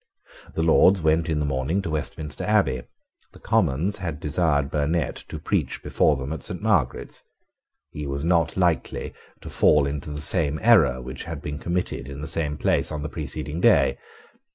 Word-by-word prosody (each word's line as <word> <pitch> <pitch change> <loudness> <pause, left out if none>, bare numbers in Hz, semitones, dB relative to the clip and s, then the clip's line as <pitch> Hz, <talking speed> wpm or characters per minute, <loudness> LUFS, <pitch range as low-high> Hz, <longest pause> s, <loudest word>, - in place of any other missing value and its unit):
The 80 - 0
Lords 90 +4 +5
went 80 +1 +2
in 80 - 0
the 75 - 0
morning 70 +6 -1
to 80 - -3
Westminster 75 -1 -4
Abbey. 80 -13 +2 0.5
The - - -15
Commons 85 +10 +1
had 85 -6 -4
desired 75 -3 +1
Burnet 75 +3 0
to - - -5
preach - - -2
before - - +2
them 65 +3 -4
at 80 - -6
Saint 90 - -4
Margaret's. 95 - 0 0.7
He 75 -1 -5
was 70 +2 -3
not 85 -1 +2
likely 90 -3 0 0.3
to - - -8
fall 75 -2 +4
into 70 +1 -4
the 75 0 -5
same 75 -1 +1
error 80 - +5
which 65 +1 -7
had - - -5
been 75 0 -5
committed 85 -6 -3
in 70 0 -7
the 75 - -5
same 80 -2 -2
place - - +1
on 75 -1 -4
the 75 - -4
preceding 75 +1 -4
day. - - +4
75 Hz, 175 wpm, -24 LUFS, 70-85 Hz, 0.7 s, Lords